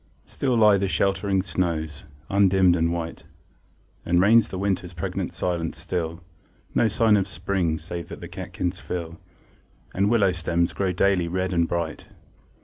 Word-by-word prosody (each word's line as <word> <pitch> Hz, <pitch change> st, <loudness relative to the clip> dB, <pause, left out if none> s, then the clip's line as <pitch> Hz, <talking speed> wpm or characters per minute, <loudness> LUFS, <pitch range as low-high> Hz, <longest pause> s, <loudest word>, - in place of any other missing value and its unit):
Still 130 Hz, -3 st, -1 dB
lie 105 Hz, -2 st, +6 dB
the 100 Hz, 0 st, 0 dB
sheltering 95 Hz, 0 st, +1 dB
snows, 80 Hz, -5 st, -2 dB, 0.2 s
undimmed 95 Hz, -2 st, +4 dB
and 85 Hz, 0 st, +1 dB
white; 85 Hz, -1 st, -4 dB, 0.8 s
And 85 Hz, +1 st, +2 dB
reigns 110 Hz, +4 st, +5 dB
the 95 Hz, -, -5 dB
winter's 95 Hz, -2 st, -2 dB
pregnant 85 Hz, -, -3 dB
silence 85 Hz, -4 st, -2 dB
still; 85 Hz, 0 st, -4 dB, 0.5 s
No -, -, +3 dB
sign 110 Hz, 0 st, +3 dB
of 95 Hz, -1 st, 0 dB
spring, 90 Hz, -1 st, -1 dB
save 85 Hz, +1 st, -7 dB
that -, -, -8 dB
the -, -, -8 dB
catkins 90 Hz, +1 st, -4 dB
fill, 85 Hz, 0 st, -5 dB, 0.7 s
And 100 Hz, +2 st, +2 dB
willow 105 Hz, -5 st, +3 dB
stems 85 Hz, -1 st, 0 dB
grow 95 Hz, -2 st, 0 dB
daily 90 Hz, -1 st, +2 dB
red 95 Hz, +2 st, -2 dB
and 85 Hz, -1 st, +2 dB
bright. 85 Hz, -2 st, -3 dB
90 Hz, 150 wpm, -24 LUFS, 85-100 Hz, 0.8 s, lie